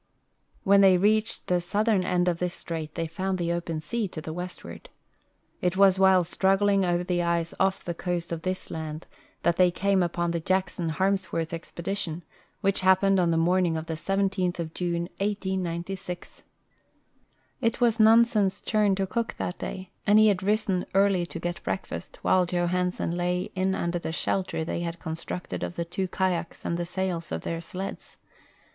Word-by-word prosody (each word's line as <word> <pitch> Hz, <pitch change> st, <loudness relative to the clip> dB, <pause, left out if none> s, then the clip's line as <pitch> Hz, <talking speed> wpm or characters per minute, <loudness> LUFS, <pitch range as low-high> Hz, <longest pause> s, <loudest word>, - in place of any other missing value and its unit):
When 200 Hz, +1 st, +6 dB
they 190 Hz, -2 st, +7 dB
reached 215 Hz, +4 st, +1 dB
the 180 Hz, -1 st, +1 dB
southern 205 Hz, +2 st, +1 dB
end 180 Hz, 0 st, +1 dB
of 170 Hz, -1 st, +1 dB
this 180 Hz, -1 st, -2 dB
strait 160 Hz, -2 st, -5 dB
they 165 Hz, -, -1 dB
found 185 Hz, +4 st, -2 dB
the 170 Hz, -1 st, 0 dB
open 165 Hz, -2 st, -3 dB
sea 230 Hz, +5 st, -2 dB
to 170 Hz, -, -7 dB
the 155 Hz, 0 st, -6 dB
westward. 180 Hz, -, -7 dB, 0.7 s
It 180 Hz, +1 st, 0 dB
was 195 Hz, -1 st, +5 dB
while 190 Hz, -1 st, +6 dB
struggling 195 Hz, +3 st, +2 dB
over 175 Hz, -1 st, +1 dB
the 180 Hz, -1 st, 0 dB
ice 170 Hz, -1 st, 0 dB
off 190 Hz, 0 st, +1 dB
the 175 Hz, -, -2 dB
coast 175 Hz, 0 st, -3 dB
of 165 Hz, -1 st, -3 dB
this 185 Hz, +2 st, -3 dB
laud 155 Hz, 0 st, -5 dB, 0.4 s
that 170 Hz, 0 st, +2 dB
they 180 Hz, -1 st, +6 dB
came 195 Hz, +2 st, +1 dB
upon 175 Hz, 0 st, 0 dB
the 170 Hz, -1 st, -2 dB
Jacksou 185 Hz, -1 st, 0 dB
Harmsworth 185 Hz, -1 st, 0 dB
expedition, 170 Hz, 0 st, -4 dB, 0.4 s
which 195 Hz, 0 st, +2 dB
happened 190 Hz, +1 st, +4 dB
on 175 Hz, -2 st, +3 dB
the 165 Hz, -, +2 dB
morning 175 Hz, 0 st, +2 dB
of 160 Hz, -, -4 dB
the 165 Hz, -, -4 dB
17th 190 Hz, +1 st, 0 dB
of 165 Hz, -2 st, -4 dB
June, 170 Hz, -1 st, -1 dB, 0.2 s
1896. 190 Hz, -2 st, -3 dB, 1.2 s
It 230 Hz, -2 st, +1 dB
was 235 Hz, -2 st, +3 dB
Nansen's 220 Hz, -3 st, +5 dB
turn 210 Hz, -3 st, +2 dB
to 195 Hz, 0 st, 0 dB
cook 230 Hz, +4 st, -2 dB
that 180 Hz, -, -4 dB
day, 185 Hz, 0 st, -6 dB, 0.2 s
and 205 Hz, +1 st, +6 dB
he 215 Hz, 0 st, +7 dB
had 195 Hz, -2 st, +1 dB
risen 195 Hz, -2 st, +1 dB
early 195 Hz, -3 st, +3 dB
to -, -, -7 dB
get 175 Hz, 0 st, -4 dB
breakfast, 190 Hz, -, -4 dB
while 185 Hz, -1 st, +3 dB
Johansen 180 Hz, 0 st, 0 dB
lay 180 Hz, +3 st, -1 dB
in 190 Hz, 0 st, 0 dB
under 170 Hz, 0 st, -1 dB
the 165 Hz, -, -4 dB
shelter 180 Hz, 0 st, -1 dB
they 170 Hz, -, -2 dB
had 170 Hz, 0 st, -3 dB
constructed 165 Hz, +2 st, -5 dB
of -, -, -4 dB
the 170 Hz, -, -2 dB
two 185 Hz, +3 st, -2 dB
kayaks 180 Hz, -2 st, -2 dB
and 170 Hz, -, 0 dB
the 175 Hz, -, -2 dB
sails 180 Hz, -2 st, -3 dB
of 80 Hz, -, -2 dB
their 165 Hz, 0 st, -3 dB
sleds. 185 Hz, +3 st, -7 dB
180 Hz, 175 wpm, -27 LUFS, 170-195 Hz, 1.2 s, they